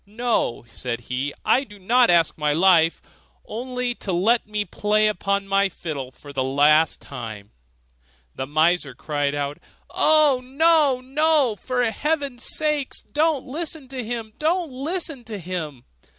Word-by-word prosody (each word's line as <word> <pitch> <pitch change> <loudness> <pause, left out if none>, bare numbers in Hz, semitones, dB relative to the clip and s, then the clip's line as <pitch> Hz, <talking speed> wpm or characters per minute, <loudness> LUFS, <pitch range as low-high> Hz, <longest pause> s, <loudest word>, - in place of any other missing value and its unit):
'No,' 220 - -1
said 120 0 -4
he, 125 +4 -3
'I 265 - +4
do 205 -5 -14
not 235 +6 +3
ask 170 -2 +3
my 150 -1 0
life; 165 -1 +4 0.4
only 250 +2 -3
to 200 - -5
let 210 +7 +2
me 210 -1 -2
play 210 +1 +1
upon 200 -1 0
my 195 0 +2
fiddle 145 -8 -6
for 140 +2 -13
the 135 -2 0
last 150 +4 +3
time.' 110 -6 -8 0.8
The 130 - -5
miser 155 -1 +1
cried 145 -2 -2
out, 145 0 -3 0.3
'Oh, 300 -4 +4
no! 285 0 +3
no! 285 -2 +2
for 245 +3 -1
heaven's 280 -1 -2
sake 300 -3 0 0.2
don't 305 -2 +1
listen 305 0 -4
to 260 -2 -5
him! 225 -1 -5
don't 330 0 0
listen 295 0 -3
to 215 -2 -5
him! 165 -8 -5
210 Hz, 145 wpm, -23 LUFS, -, 0.8 s, I